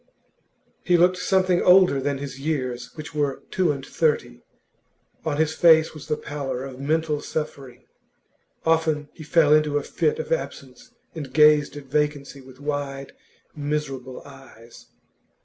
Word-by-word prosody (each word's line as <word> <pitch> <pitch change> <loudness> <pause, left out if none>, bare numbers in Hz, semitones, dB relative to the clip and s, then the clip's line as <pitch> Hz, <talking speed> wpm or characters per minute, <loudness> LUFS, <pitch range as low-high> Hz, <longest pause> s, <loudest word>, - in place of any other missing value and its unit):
He 175 -1 +3
looked 180 +2 +4
something 185 -1 +2
older 180 -6 +5
than 140 +1 -1
his 135 -1 -7
years, 130 -5 -3
which 155 0 -8
were 145 -3 -2
two 180 -4 +2
and 135 -2 -5
thirty; 150 - -1 0.8
on 155 -2 -2
his 160 0 +1
face 160 -2 +5
was 155 - -11
the 150 - -1
pallor 140 -4 -5
of 135 -1 -8
mental 155 +1 0
suffering. 140 -6 -6 0.8
Often 160 -2 +1
he - - -13
fell 150 -1 +4
into 150 -1 +3
a 145 - -2
fit 455 0 0
of 475 +1 -6
absence, - - -4 0.2
and 150 -6 -7
gazed 150 0 +4
at 145 - -8
vacancy 145 0 -2
with 130 0 -16
wide, 140 -2 -4 0.4
miserable 145 -4 -4
eyes. 135 -4 -15
150 Hz, 145 wpm, -24 LUFS, 135-160 Hz, 0.8 s, older